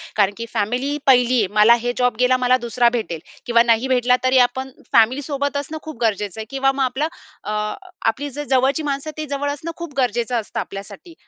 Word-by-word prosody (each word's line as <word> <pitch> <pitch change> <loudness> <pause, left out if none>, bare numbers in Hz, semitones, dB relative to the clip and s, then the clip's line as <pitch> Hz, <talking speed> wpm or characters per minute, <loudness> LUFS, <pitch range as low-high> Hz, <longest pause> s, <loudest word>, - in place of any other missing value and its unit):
कारण 200 -1 +3
की 230 - -4
फॅमिली 245 +7 -1
1ली 250 -1 +4
आहे. 215 -5 +2
मला 215 +2 +6
हे 245 - 0
जॉब 250 -2 +2
गेला, 250 0 +4
मला 250 0 +3
2रा 240 0 +2
भेटेल 170 -7 -4 0.3
किंवा 235 -1 +4
नाही 235 +1 +2
भेटला 250 -1 +3
तरी, 255 0 +3
आपण 260 +2 -7 0.2
फॅमिलीसोबत 280 +5 +2
असणं 290 +3 -4
खूप 315 -4 -8
गरजेचं 210 -3 -1
आहे 220 - -4
किंवा 270 0 +1
मग 270 0 -1
आपलं 265 +4 0 0.4
अ, 210 - -4 0.6
आपली 285 +1 -4
जर 290 +2 -6
जवळची 265 +3 +2
माणसं 285 +1 -3
ते 310 - -3
जवळ 285 0 -2
असणं 305 +4 -5
खूप 340 -4 -7
गरजेचं 240 -1 0
असतं 210 - -6
आपल्यासाठी. 200 - -8
255 Hz, 195 wpm, -20 LUFS, 230-280 Hz, 0.6 s, मला